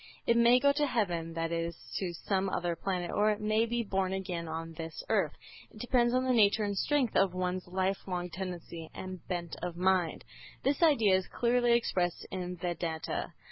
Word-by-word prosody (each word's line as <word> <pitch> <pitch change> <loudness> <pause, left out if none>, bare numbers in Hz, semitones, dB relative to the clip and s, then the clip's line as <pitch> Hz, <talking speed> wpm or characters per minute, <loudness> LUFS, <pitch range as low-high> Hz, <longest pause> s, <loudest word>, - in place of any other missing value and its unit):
It 235 - +4
may 235 +1 +6
go 280 +2 +5
to 295 +1 +1
heaven, 175 -9 -1
that 165 0 -1
is, 170 0 -2 0.2
to 185 -3 -2
some 190 +3 -1
other 175 -2 -1
planet, 180 -1 -2
or 210 +1 +3
it 210 -1 0
may 215 +2 +2
be 235 0 -1
born 190 -2 -1
again 180 -3 -3
on 165 +1 -5
this 165 -1 -6
earth. - - +2 0.4
It 215 - -15
depends 240 0 +2
on 255 - +2
the 260 -1 +2
nature 215 -2 +4
and 205 -1 -1
strength 270 +3 +1
of 190 -2 +3
one's 185 0 -2
life 190 +2 -1
long 180 -1 -3
tendency 175 -2 -6
and 185 -1 -6
bent 175 -3 -3
of 175 -1 -4
mind. 185 -2 +1 0.4
This 280 +3 +1
idea 265 - +5
is 190 - -4
clearly 240 0 +2
expressed 180 -7 0
in 180 -1 -4
Vedanta. 165 -2 -3
190 Hz, 190 wpm, -31 LUFS, 175-225 Hz, 0.4 s, may